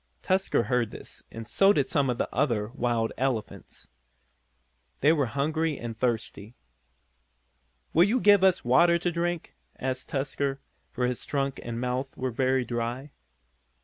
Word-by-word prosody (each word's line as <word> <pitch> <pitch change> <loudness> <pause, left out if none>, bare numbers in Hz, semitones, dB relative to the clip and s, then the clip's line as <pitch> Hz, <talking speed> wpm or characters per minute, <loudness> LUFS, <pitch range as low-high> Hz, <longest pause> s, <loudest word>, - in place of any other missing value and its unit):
Tusker 190 -9 +1
heard 120 -1 0
this, - - -8
and 115 0 -8
so 195 - +4
did 140 -7 +2
some 135 0 +1
of 125 - -1
the - - -1
other 115 -6 0
wild 120 -3 -1
elephants. 130 -4 -3 1.1
They 150 +4 +5
were 145 -5 +1
hungry 150 +5 -1
and 115 -1 -6
thirsty. 115 -2 -3 1.4
"Will 170 +3 +6
you 230 +6 +1
give 205 -3 +5
us 190 -7 +3
water 170 +8 +5
to 175 +1 -1
drink?" 170 0 -2 0.3
asked 130 0 -3
Tusker, 135 0 -2 0.3
for 125 - -1
his 125 -1 -2
trunk 135 -2 -2
and 115 -1 -5
mouth 125 +2 -3
were 130 0 -2
very 130 +1 +1
dry. 120 +4 -3
130 Hz, 145 wpm, -27 LUFS, 120-155 Hz, 1.4 s, Will